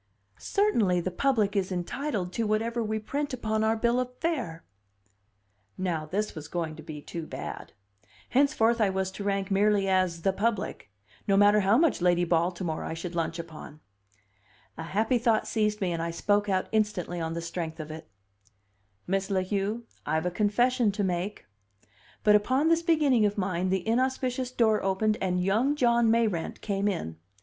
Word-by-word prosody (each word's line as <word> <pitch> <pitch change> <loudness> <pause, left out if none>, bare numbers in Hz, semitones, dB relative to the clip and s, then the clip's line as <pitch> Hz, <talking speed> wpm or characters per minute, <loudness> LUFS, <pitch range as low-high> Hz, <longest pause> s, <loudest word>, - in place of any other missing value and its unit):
"Certainly 225 - +2
the 185 - -3
public 215 -1 +1
is 195 -1 0
entitled 185 +1 -3
to 225 +1 -1
whatever 225 +3 0
we 220 0 -1
print 280 +5 -3
upon 220 -2 -1
our 220 +1 +2
bill 235 +2 +2
of 250 0 -4
fare." 250 - -3 1.1
Now 170 -5 -2
this 210 +6 -2
was 155 -2 -8
going 165 -2 -3
to - - -9
be 150 -2 -8
too 165 -2 -6
bad! - - -7 0.6
Henceforth 235 -4 +3
I 205 - +4
was 190 0 -1
to 200 - -7
rank 200 0 -1
merely 200 0 +3
as 185 -3 +1
"the 195 - +2
public," 210 - -2 0.4
no 195 -1 +3
matter 205 +1 +6
how 200 +3 +4
much 315 - +2
Lady 175 0 +3
Baltimore 170 -1 0
I 160 - -4
should 170 +1 -6
lunch 165 0 -2
upon! 155 -2 -9 1.0
A - - -7
happy 220 +9 0
thought 230 -2 +2
seized 210 -1 0
me, 185 -2 0
and 165 -1 -2
I 165 - -2
spoke 205 +4 +1
out 185 -1 +1
instantly 205 -5 -1
on 160 0 -2
the 170 - -3
strength 165 -1 -5
of 155 0 -6
it. 160 0 -9 1.0
"Miss 195 +1 -1
La 190 -2 +1
Heu, 205 +4 -2 0.2
I've 160 +2 -1
a 180 - 0
confession 225 +4 +2
to 205 - -1
make." 185 +2 -2 0.8
But 210 0 +6
upon 260 +9 +2
this 330 0 +3
beginning 295 - +3
of 205 - -4
mine 185 -1 -1
the 190 0 -1
inauspicious 255 +1 0
door 225 -4 +2
opened 210 +3 +1
and 180 -1 0
young 225 +10 +2
John 235 -4 +3
Mayrant 220 -7 0
came 200 -1 -1
in. 165 - -3
200 Hz, 175 wpm, -28 LUFS, 175-230 Hz, 1.1 s, matter